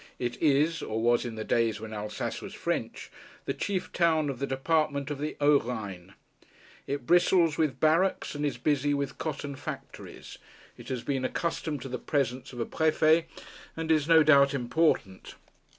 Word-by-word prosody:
It 120 -1 -4
is 155 +2 +2
or 110 +1 -3
was 120 +2 +2
in 115 -2 -5
the 110 - -4
days 115 -1 +1
when 110 0 -8
Alsace 105 0 -4
was - - -8
French - - -3 0.3
the - - -1
chief 195 -2 -3
town 160 -4 +2
of 125 - -9
the 140 - -2
department 140 +1 0
of 145 - -4
the 150 +1 -4
Haut 145 0 +4
Rhine. 100 -6 -6 0.7
It 140 -2 -3
bristles 175 -1 +4
with 155 -4 0
barracks, 165 +5 +2
and 145 0 -4
is 145 -4 -1
busy 145 +2 +1
with 140 -1 -4
cotton 145 -2 -4
factories. - - -9 0.4
It - - -12
has 125 -3 -3
been 135 -2 -2
accustomed 155 0 -2
to - - -6
the 125 -1 -5
presence 130 -3 -2
of 120 - -9
a 115 - -1
prefet, 160 +1 +3 0.5
and 160 0 -2
is 155 -2 +2
no 165 -1 +7
doubt 140 -2 +5
important. 120 - 0
140 Hz, 175 wpm, -28 LUFS, 125-155 Hz, 0.7 s, no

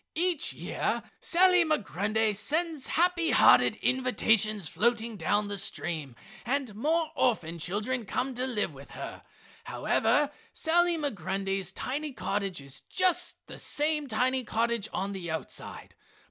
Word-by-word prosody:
Each 345 -1 +1
year - - -2 0.2
Sally 365 0 +5
Migrundy 215 - 0
sends 310 - -1
happy 345 0 +2
hearted - - +6
invitations 220 -6 +2
floating 230 +4 0
down 205 +1 0
the 200 -1 -2
stream 160 -8 -3 0.3
and 260 -2 -1
more 315 +8 0
orphan 170 -9 0
children 215 +7 -2
come 260 +1 -1
to 250 +1 -2
live 210 - -1
with 140 +1 -13
her. - - -7 0.4
However 295 -1 +1 0.2
Sally 345 +1 +2
Migrundy's 195 - -2
tiny 285 +7 -3
cottage 195 - -2
is 140 -1 -7
just 370 -2 0
the - - -10
same 300 0 0
tiny 255 +2 +1
cottage 230 -1 0
on 195 +1 -2
the 185 -3 -5
outside. 160 - -6
235 Hz, 130 wpm, -29 LUFS, 200-300 Hz, 0.4 s, hearted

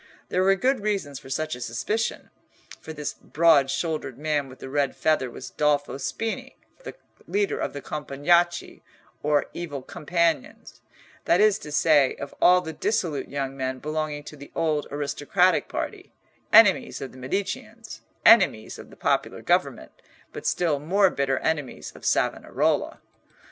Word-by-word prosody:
There 185 - +1
were 195 +1 +4
good 255 +6 +1
reasons 195 -10 -2
for 130 - -14
such 155 +2 -2
a 125 - -11
suspicion; 210 - -2 0.5
for - - -9
this 150 -2 -4
broad 155 -4 +3
shouldered 155 -5 -3
man 145 -2 -1
with 130 - -12
the - - -9
red 140 0 0
feather 155 -5 +1
was 125 - -9
Dolfo 145 -2 0
Spini, 225 +9 -4 0.7
leader 205 0 0
of - - -3
the 140 - -7
Compagnacci, 170 +4 0 0.4
or 145 -1 +2
Evil 145 -6 -6
Companions—that 165 +2 -2
is 215 -1 +4
to 150 - -9
say, 145 -3 +4
of 140 - -8
all 180 0 +6
the 160 -2 -6
dissolute 170 -4 -1
young 135 -1 -3
men 130 -1 -3
belonging 155 +1 -3
to 150 - -10
the 140 -1 -12
old 155 -3 0
aristocratic 145 +6 +1
party, - - -5 0.4
enemies 215 -4 +5
of 135 - -6
the 130 - -14
Mediceans, 200 - -5 0.2
enemies 190 - +5
of - - -11
the - - -16
popular - - -1
government, - - 0 0.4
but - - -5
still 160 -5 +1
more 190 +5 +3
bitter 135 -1 0
enemies 150 -4 -3
of - - -12
Savonarola. - - 0
150 Hz, 150 wpm, -25 LUFS, 140-180 Hz, 0.7 s, all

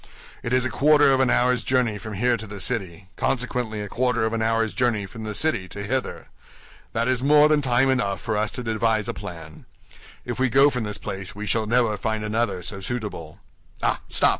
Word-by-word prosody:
"It 120 - -4
is 130 0 +2
a 130 - -2
quarter 150 +1 +5
of 130 - +2
an 130 -2 +3
hour's 125 0 +2
journey 125 -5 +1
from 110 +3 -7
here 120 +4 +2
to 110 -1 -7
the 100 0 -8
city, 95 -4 -2
consequently 120 -4 -1
a 105 - -5
quarter 120 +1 0
of 110 - -1
an 115 - -1
hour's 115 -1 +1
journey 120 -5 0
from 110 +2 -9
the 105 -1 -4
city 155 -12 +1
to 100 +2 -7
hither. 130 +5 -3 0.6
That 115 +2 0
is 130 -1 +1
more 150 +2 +6
than 150 -1 +3
time 125 -1 +3
enough 100 -8 0
for 110 -2 -3
us 105 +1 0
to 125 - -5
devise 110 -2 0
a - - -2
plan. 80 -6 -9 0.6
If 120 -1 -4
we 130 0 +2
go 135 +4 +5
from 125 -4 -3
this 105 -1 -4
place 95 -2 -6
we 105 +1 -5
shall 110 +1 0
never 115 -2 +2
find 110 +1 -2
another 105 -4 -1
so 95 +3 -3
suitable. 95 -7 -5 0.5
Ah, - - +1
stop! - - +4
115 Hz, 215 wpm, -24 LUFS, 105-125 Hz, 0.6 s, more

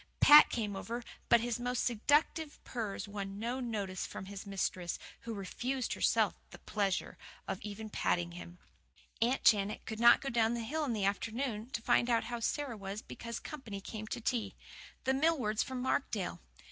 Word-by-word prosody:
Pat 295 +1 +10
came 210 -4 -2
over, 235 +5 -4 0.3
but 235 - +6
his 240 0 -1
most 245 0 -1
seductive 295 +6 +2
purrs 220 -5 -4
won 200 -1 -5
no 235 +4 -2
notice 205 -7 -3
from 190 - -6
his 200 +1 -8
mistress, 185 -3 -2 0.2
who 230 - -6
refused 245 +6 -2
herself - - +3 0.2
the - - -11
pleasure 200 -3 -2 0.3
of 190 - -3
even 210 +1 -6
patting 175 -4 0
him. 175 0 -9 0.6
Aunt 245 +4 +2
Janet 205 -1 +3
could 220 0 -5
not 235 0 +8
go 275 - -3
down 230 -1 +2
the 235 - -3
hill 305 +6 -1
in 250 - -1
the 205 -3 0
afternoon 225 +3 -2
to 235 -3 -4
find 240 - +3
out 230 -1 +3
how 240 -1 -4
Sara 270 +1 -1
was 200 +1 -6
because 235 0 -6
company 235 -10 -7
came 215 +2 -7
to - - -3
tea 235 0 -1 0.5
the 265 - +2
Millwards 265 -7 +2
from 260 -1 -3
Markdale. 225 -8 -1
225 Hz, 175 wpm, -33 LUFS, 200-245 Hz, 0.6 s, Pat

